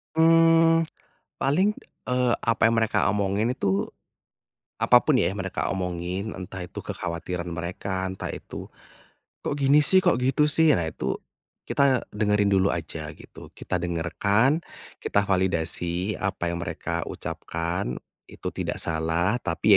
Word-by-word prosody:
Mmm, 165 Hz, 0 st, +5 dB, 0.5 s
paling, 180 Hz, +10 st, +3 dB, 0.3 s
eee, 125 Hz, -1 st, +1 dB
apa 115 Hz, -1 st, +3 dB
yang 115 Hz, -, +2 dB
mereka 110 Hz, -1 st, +2 dB
omongin 105 Hz, +4 st, +1 dB
itu, 100 Hz, -4 st, 0 dB, 0.9 s
apa -, -, +6 dB
pun -, -, +2 dB
ya -, -, +2 dB
yang 100 Hz, -, -6 dB
mereka 95 Hz, 0 st, -2 dB
omongin 90 Hz, +2 st, -3 dB
entah 95 Hz, -1 st, -7 dB
itu -, -, -8 dB
kekhawatiran 85 Hz, 0 st, -4 dB
mereka, 90 Hz, +3 st, -4 dB
entah 95 Hz, -, -5 dB
itu, -, -, -7 dB, 0.7 s
"Kok -, -, -2 dB
gini 140 Hz, +2 st, +5 dB
sih? 185 Hz, +5 st, +4 dB
Kok 125 Hz, -, +3 dB
gitu 135 Hz, +4 st, +3 dB
sih?" 160 Hz, +1 st, +4 dB
Nah 85 Hz, -, -1 dB
itu, 80 Hz, -, -3 dB, 0.5 s
kita 135 Hz, -3 st, +2 dB
dengerin 105 Hz, -1 st, +2 dB
dulu 95 Hz, 0 st, +3 dB
aja 80 Hz, -2 st, -4 dB
gitu, -, -, -13 dB
kita 90 Hz, -2 st, -2 dB
dengarkan, 100 Hz, -, +1 dB, 0.4 s
kita 100 Hz, 0 st, +1 dB
validasi 90 Hz, 0 st, 0 dB
apa 95 Hz, -3 st, -2 dB
yang 85 Hz, -, -4 dB
mereka 85 Hz, 0 st, -3 dB
ucapkan 85 Hz, -6 st, -3 dB, 0.3 s
itu -, -, -5 dB
tidak -, -, -3 dB
salah, 85 Hz, +8 st, 0 dB
tapi 90 Hz, +5 st, +2 dB
100 Hz, 135 wpm, -25 LUFS, 85-125 Hz, 0.9 s, apa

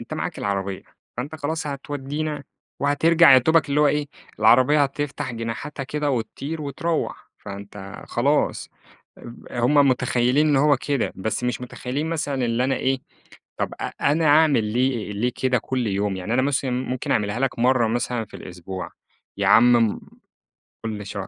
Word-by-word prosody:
أنت -, -, -7 dB
معاك -, -, -4 dB
العربيّة، 100 Hz, -1 st, -3 dB, 0.3 s
فأنت 140 Hz, +6 st, -5 dB
خلاص 160 Hz, +1 st, -3 dB
هتودينا 145 Hz, +1 st, -4 dB, 0.4 s
وهترجع 160 Hz, +2 st, +5 dB
يادوبك 155 Hz, +5 st, +4 dB
اللي 140 Hz, +1 st, +2 dB
هو 150 Hz, -, +5 dB
إيه، 150 Hz, 0 st, +1 dB, 0.3 s
العربيّة 130 Hz, +7 st, +5 dB
هتفتح 140 Hz, -2 st, -3 dB
جناحاتها 115 Hz, +5 st, -5 dB
كده 150 Hz, +2 st, -2 dB
وتطير 135 Hz, +6 st, -4 dB
وتروّح، 155 Hz, +3 st, -3 dB
فأنت 100 Hz, -1 st, -9 dB
خلاص -, -, 0 dB, 0.5 s
آب 120 Hz, -, -10 dB, 0.2 s
هم 120 Hz, +4 st, +1 dB
متخيلين 125 Hz, +3 st, +2 dB
إن 145 Hz, -, +3 dB
هو 145 Hz, +1 st, +4 dB
كده. 140 Hz, 0 st, -1 dB
بس 110 Hz, +5 st, -2 dB
مش 125 Hz, 0 st, -1 dB
متخيلين 125 Hz, +4 st, -4 dB
مثلًا 145 Hz, -5 st, -1 dB
اللي 120 Hz, +1 st, 0 dB
أنا 135 Hz, +1 st, +1 dB
إيه، 135 Hz, 0 st, 0 dB, 0.6 s
طب -, -, -2 dB
أ -, -, -1 dB, 0.2 s
أنا 155 Hz, +3 st, +2 dB
أعمل 150 Hz, -5 st, +5 dB
ليه 120 Hz, 0 st, -1 dB
ليه 120 Hz, +5 st, 0 dB
كده 130 Hz, -1 st, +1 dB
كل 125 Hz, +1 st, -2 dB
يوم؟ 100 Hz, 0 st, -1 dB
يعني 95 Hz, +5 st, -3 dB
أنا 130 Hz, -, +3 dB
مثلًا 135 Hz, -1 st, 0 dB
ممكن 125 Hz, 0 st, -3 dB
أعملها 105 Hz, +1 st, 0 dB
لك 135 Hz, -3 st, -1 dB
مرّة 125 Hz, -1 st, +3 dB
مثلًا 120 Hz, 0 st, -1 dB
في -, -, -26 dB
الأسبوع، 90 Hz, 0 st, -7 dB, 0.5 s
يا -, -, 0 dB
عم 120 Hz, +1 st, +6 dB, 0.2 s
م -, -, -10 dB, 0.9 s
كل 105 Hz, -2 st, -4 dB
شهر. 100 Hz, -1 st, -5 dB
130 Hz, 160 wpm, -23 LUFS, 115-145 Hz, 0.9 s, عم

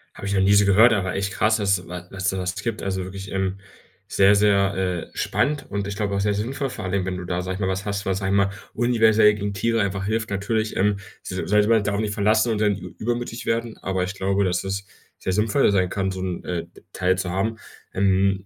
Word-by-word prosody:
Habe 100 Hz, -, -6 dB
ich 100 Hz, -, -1 dB
noch 95 Hz, -, +2 dB
nie 95 Hz, +1 st, +4 dB
so 100 Hz, 0 st, +5 dB
gehört, 110 Hz, +4 st, +6 dB
aber 95 Hz, -3 st, -1 dB
echt 100 Hz, 0 st, -2 dB
krass, 110 Hz, 0 st, +2 dB
dass 95 Hz, -4 st, 0 dB
wa 90 Hz, 0 st, -6 dB
das 95 Hz, -1 st, -6 dB
es -, -, +4 dB
sowas 95 Hz, -1 st, -2 dB
gibt. 105 Hz, +2 st, -3 dB
Also, 95 Hz, -1 st, -2 dB
wirklich, 95 Hz, +1 st, -8 dB
ähm, 95 Hz, 0 st, -2 dB, 0.5 s
sehr, 100 Hz, +1 st, +5 dB
sehr, 100 Hz, -1 st, +3 dB, 0.4 s
äh, -, -, -15 dB
spannend 145 Hz, 0 st, 0 dB
und 100 Hz, -1 st, -2 dB
ich 100 Hz, 0 st, -5 dB
glaube 100 Hz, -1 st, -1 dB
auch 100 Hz, -, 0 dB
sehr 105 Hz, 0 st, +1 dB
sinnvoll 130 Hz, +7 st, -2 dB
vor 120 Hz, -, -6 dB
allen 90 Hz, -, -3 dB
Dingen, 95 Hz, -2 st, 0 dB
wenn 95 Hz, -1 st, -3 dB
du 90 Hz, -, -6 dB
da, 90 Hz, 0 st, -2 dB
sage 90 Hz, +1 st, -4 dB
ich -, -, -7 dB
mal, 95 Hz, -, 0 dB
was 95 Hz, 0 st, -2 dB
hast, 100 Hz, -1 st, -3 dB
was, 95 Hz, 0 st, 0 dB
sage 95 Hz, -1 st, -1 dB
ich 100 Hz, -, +3 dB
mal, 100 Hz, 0 st, +3 dB, 0.2 s
universell 110 Hz, -3 st, +4 dB
gegen 100 Hz, 0 st, -3 dB
Tiere 115 Hz, +4 st, +1 dB
einfach 100 Hz, -1 st, -2 dB
hilft. 110 Hz, +1 st, -1 dB
Natürlich, 110 Hz, +2 st, -1 dB
ähm, 105 Hz, +1 st, +2 dB, 0.3 s
sa 95 Hz, 0 st, -4 dB
sage 105 Hz, +1 st, +4 dB
ich -, -, -1 dB
mal, 110 Hz, -2 st, +4 dB
darauf 100 Hz, 0 st, -1 dB
nicht 105 Hz, -1 st, -1 dB
verlassen 110 Hz, +3 st, +2 dB
und 105 Hz, -, -2 dB
dann 105 Hz, -2 st, +2 dB
ü -, -, -9 dB
übermütig 120 Hz, 0 st, -3 dB
werden, 115 Hz, 0 st, -1 dB
aber 95 Hz, -1 st, -1 dB
ich 90 Hz, -, -5 dB
glaube, 95 Hz, +1 st, +1 dB
dass 90 Hz, -1 st, 0 dB
es 100 Hz, +1 st, -3 dB, 0.3 s
sehr 95 Hz, -, -2 dB
sinnvoll 105 Hz, +5 st, +3 dB
sein 95 Hz, -2 st, +2 dB
kann, 95 Hz, 0 st, -1 dB
so 95 Hz, -1 st, -5 dB
'n, 90 Hz, -2 st, -4 dB
äh, 85 Hz, -1 st, -3 dB, 0.3 s
Teil 90 Hz, 0 st, +1 dB
zu 95 Hz, -1 st, -2 dB
haben. 105 Hz, +5 st, -1 dB, 0.4 s
Ähm, 95 Hz, 0 st, +2 dB
100 Hz, 255 wpm, -23 LUFS, 95-105 Hz, 0.5 s, gehört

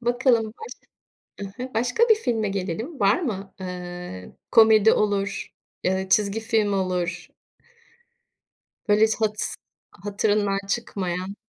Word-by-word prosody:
Bakalım 240 Hz, -1 st, +2 dB
baş 340 Hz, -, -9 dB, 0.7 s
I -, -, -4 dB, 0.2 s
hı, 255 Hz, -, -8 dB
başka 245 Hz, -, +1 dB
bir 445 Hz, -, +8 dB
filme 230 Hz, -, -1 dB
gelelim. 200 Hz, -, -4 dB
Var 200 Hz, -, +3 dB
mı? 200 Hz, -, -4 dB
Iıı, 180 Hz, -, -7 dB, 0.2 s
komedi 220 Hz, -1 st, +7 dB
olur, 200 Hz, -1 st, -1 dB, 0.4 s
ııı, 190 Hz, +1 st, -1 dB
çizgi 200 Hz, +3 st, +2 dB
film 220 Hz, -2 st, +1 dB
olur. 180 Hz, -2 st, -2 dB, 1.6 s
Böyle 210 Hz, +1 st, +5 dB
hiç 220 Hz, -, 0 dB
hats 215 Hz, -1 st, 0 dB, 0.4 s
hatırından 205 Hz, +1 st, 0 dB
çıkmayan. 190 Hz, -3 st, -3 dB
205 Hz, 115 wpm, -24 LUFS, 190-225 Hz, 1.6 s, bir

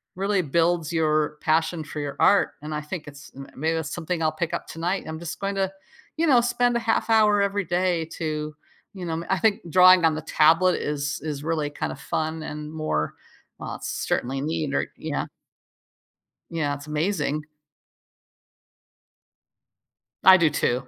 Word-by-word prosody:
really 195 Hz, +1 st, +1 dB
builds 170 Hz, +2 st, +1 dB
your, 155 Hz, -2 st, +2 dB
passion 160 Hz, +1 st, +1 dB
for 150 Hz, -, -6 dB
your 145 Hz, -1 st, -4 dB
art, 200 Hz, -, +4 dB
and 155 Hz, +1 st, -6 dB
I 150 Hz, -, -2 dB
think 150 Hz, +1 st, -7 dB
it's 145 Hz, -1 st, -12 dB
m 135 Hz, 0 st, -9 dB
maybe 160 Hz, +4 st, 0 dB
that's 160 Hz, -2 st, -3 dB
something 175 Hz, 0 st, -3 dB
I'll 155 Hz, -, +2 dB
pick 160 Hz, +1 st, -3 dB
up -, -, -3 dB
tonight. 175 Hz, +4 st, -2 dB
I'm 160 Hz, 0 st, -5 dB
just 170 Hz, -1 st, -6 dB
going 200 Hz, 0 st, -2 dB
to, 195 Hz, -1 st, 0 dB, 0.5 s
you 330 Hz, -, +2 dB
know, 255 Hz, -5 st, +6 dB
spend 240 Hz, 0 st, +1 dB
a -, -, 0 dB
half 230 Hz, 0 st, 0 dB
hour 210 Hz, -2 st, +5 dB
every 200 Hz, 0 st, 0 dB
day 175 Hz, -1 st, +1 dB, 0.2 s
to, 155 Hz, -2 st, -3 dB, 0.4 s
you 185 Hz, -3 st, -7 dB
know 165 Hz, -, -3 dB
m 165 Hz, +1 st, -4 dB
I 190 Hz, 0 st, +1 dB
think 220 Hz, +3 st, +2 dB
drawing 185 Hz, 0 st, +7 dB
on 160 Hz, -1 st, +3 dB
the 155 Hz, -, -4 dB
tablet 165 Hz, +4 st, +4 dB
is 145 Hz, 0 st, -2 dB
is 150 Hz, -2 st, -4 dB
really 155 Hz, -2 st, -1 dB
kinda -, -, -4 dB
fun 160 Hz, 0 st, -3 dB
and 150 Hz, 0 st, -6 dB
more, 155 Hz, -, -1 dB, 0.5 s
uh, -, -, -5 dB
certainly 135 Hz, +2 st, -2 dB
need 155 Hz, -1 st, -2 dB
or -, -, 0 dB
yeah -, -, -3 dB, 1.2 s
Yeah. 155 Hz, -4 st, -1 dB
It's 145 Hz, +1 st, -8 dB
amazing. 155 Hz, -1 st, -1 dB, 2.8 s
I 190 Hz, 0 st, +9 dB
do 165 Hz, -3 st, +4 dB
too. 125 Hz, -2 st, 0 dB
160 Hz, 170 wpm, -24 LUFS, 150-185 Hz, 2.8 s, I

